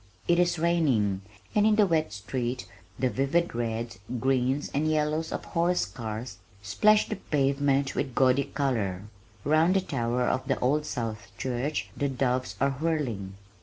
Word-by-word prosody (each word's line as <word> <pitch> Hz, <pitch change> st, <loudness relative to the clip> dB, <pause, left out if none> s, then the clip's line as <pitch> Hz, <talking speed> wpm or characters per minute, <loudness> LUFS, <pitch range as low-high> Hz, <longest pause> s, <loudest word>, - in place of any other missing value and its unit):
It 175 Hz, 0 st, +4 dB
is 175 Hz, 0 st, +2 dB
raining, 140 Hz, -, +2 dB, 0.3 s
and 210 Hz, -, +4 dB
in 215 Hz, 0 st, +5 dB
the 210 Hz, -1 st, +5 dB
wet 160 Hz, -, +1 dB
street 120 Hz, +5 st, -3 dB, 0.3 s
the 130 Hz, -, +1 dB
vivid 140 Hz, +7 st, +1 dB
reds, 115 Hz, -2 st, -3 dB, 0.2 s
greens, 130 Hz, +2 st, +1 dB
and 150 Hz, +3 st, +1 dB
yellows 155 Hz, +1 st, 0 dB
of -, -, -3 dB
the -, -, -13 dB
horse 175 Hz, +2 st, +1 dB
cars, 110 Hz, +4 st, -6 dB, 0.3 s
splash 210 Hz, -, +4 dB
the -, -, -3 dB
pavement 140 Hz, -3 st, +1 dB
with 130 Hz, -4 st, -3 dB
gaudy 130 Hz, +1 st, +4 dB
color. 115 Hz, -10 st, -1 dB, 0.4 s
Round 160 Hz, +5 st, +3 dB
the 195 Hz, -, +4 dB
tower 125 Hz, -7 st, -1 dB
of 130 Hz, +1 st, 0 dB
the -, -, +1 dB
Old 150 Hz, +4 st, +1 dB
South 115 Hz, -2 st, -4 dB
Church 130 Hz, +4 st, -2 dB
the 140 Hz, -, 0 dB
doves 130 Hz, -1 st, -1 dB
are 140 Hz, +1 st, +2 dB
whirling. 130 Hz, -10 st, -2 dB
135 Hz, 160 wpm, -28 LUFS, 120-155 Hz, 0.4 s, in